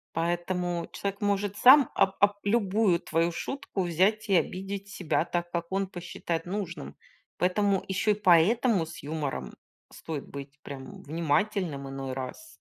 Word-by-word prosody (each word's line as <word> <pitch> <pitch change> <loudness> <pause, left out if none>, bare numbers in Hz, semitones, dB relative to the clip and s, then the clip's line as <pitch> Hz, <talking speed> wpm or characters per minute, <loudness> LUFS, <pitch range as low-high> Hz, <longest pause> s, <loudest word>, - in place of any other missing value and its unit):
Поэтому 175 +1 -1
человек 200 0 -3
может 205 0 0
сам 260 +3 +8
об 190 0 +2
об 205 0 +5
любую 200 -4 +2
твою 165 +1 0
шутку 195 - -4
взять 195 +6 +1
и 195 - +4
обидеть 195 +3 -3
себя 180 -4 -1
так, 175 0 -3
как 170 -1 -2
он 195 0 0
посчитает 175 -2 -4
нужным. 175 - -5 0.4
Поэтому, 195 +2 +2
ещё 195 +3 +2
и - - +5
поэтому, 200 +1 +4
с 160 - -10
юмором 150 -2 -4 0.4
стоит 155 -4 -6
быть 140 +1 -9
прям 135 -2 -9
внимательным 160 -1 -1
иной 135 -1 -5
раз. 130 - -6
180 Hz, 145 wpm, -28 LUFS, 165-200 Hz, 0.4 s, сам